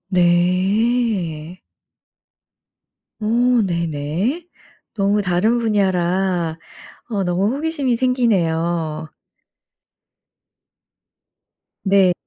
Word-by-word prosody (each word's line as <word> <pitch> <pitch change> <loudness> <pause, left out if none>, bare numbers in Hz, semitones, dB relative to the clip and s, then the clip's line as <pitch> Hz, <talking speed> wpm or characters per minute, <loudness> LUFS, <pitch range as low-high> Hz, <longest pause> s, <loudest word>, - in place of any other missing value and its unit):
네. 185 0 +1 1.6
어 215 - -3 0.4
네네. 170 - -2 0.5
너무 205 0 +1
다른 195 +6 +1
분야라 185 -5 0 0.5
어 200 -4 -1
너무 180 +3 +1
호기심이 285 -6 -1
생기네요. 170 -10 0 2.8
네. 195 -2 +4
185 Hz, 110 characters per minute, -20 LUFS, 170-220 Hz, 2.8 s, 네